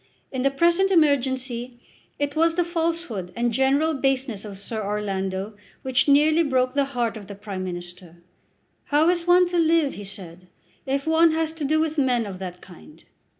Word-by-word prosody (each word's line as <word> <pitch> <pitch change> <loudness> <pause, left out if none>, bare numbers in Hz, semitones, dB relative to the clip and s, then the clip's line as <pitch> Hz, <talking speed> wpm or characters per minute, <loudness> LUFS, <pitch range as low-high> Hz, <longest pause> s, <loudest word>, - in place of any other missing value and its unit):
In 260 - -3
the 275 - +3
present 340 +7 +2
emergency, 260 -7 +1 0.4
it 285 0 -2
was 325 +1 +2
the 350 - +2
falsehood 330 - -2
and 235 0 0
general 275 +6 +2
baseness 265 -6 -1
of 205 -3 -8
Sir 215 +2 -5
Orlando 195 -1 -3 0.3
which 260 +1 +1
nearly 300 +3 +5
broke 255 -4 +1
the 280 -1 +2
heart 235 -2 0
of 205 -3 -11
the 200 - -8
Prime 200 -2 -6
Minister. 175 -1 -7 0.7
"How 300 +3 +3
is 350 -1 0
one 360 0 +5
to 350 -1 0
live," 325 -3 +2
he 205 - -8
said, 185 -2 -10 0.4
"if 275 +1 -1
one 320 0 +4
has 320 0 0
to 320 -1 -7
do 310 +3 +2
with 315 -1 -1
men 250 -4 +1
of 190 -3 -7
that 180 -1 -7
kind?" 195 - -15
265 Hz, 180 wpm, -24 LUFS, 205-315 Hz, 0.7 s, nearly